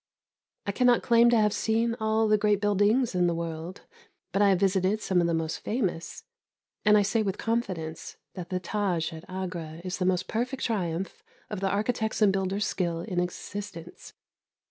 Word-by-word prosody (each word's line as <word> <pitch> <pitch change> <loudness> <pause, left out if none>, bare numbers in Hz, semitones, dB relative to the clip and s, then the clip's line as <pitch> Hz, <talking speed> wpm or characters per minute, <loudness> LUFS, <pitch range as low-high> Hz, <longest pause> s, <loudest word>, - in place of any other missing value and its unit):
I 200 - 0
cannot 245 +3 +3
claim 235 0 +5
to 240 - +4
have 210 -1 +3
seen 230 +1 +1
all 220 0 +2
the 215 - +5
great 210 -1 +2
buildings 205 +4 +2
in 180 -1 +2
the 170 - 0
world, 165 +2 -5 0.5
but 195 - +1
I 205 - +6
have 190 -2 +3
visited 195 +1 +2
some 185 -4 +1
of 170 - +2
the 170 - 0
most 160 -1 -2
famous, 195 - -3 0.6
and 210 0 +6
I 205 - +4
say 215 +3 +1
with 195 -3 -2
confidence 185 -9 -3 0.2
that 180 -2 -7
the 185 - -1
Tâj 180 -4 -1
at 160 - -12
Agra 175 -4 -5
is 185 +1 -4
the 180 - 0
most 185 0 +1
perfect 250 +4 -2
triumph 185 -5 -2 0.3
of 210 - -3
the 195 0 0
architect's 220 +2 -1
and 205 -3 +4
builder's 195 +1 0
skill 170 -3 -1
in 180 -2 -2
existence. 180 -1 -6
195 Hz, 185 wpm, -27 LUFS, 175-215 Hz, 0.6 s, I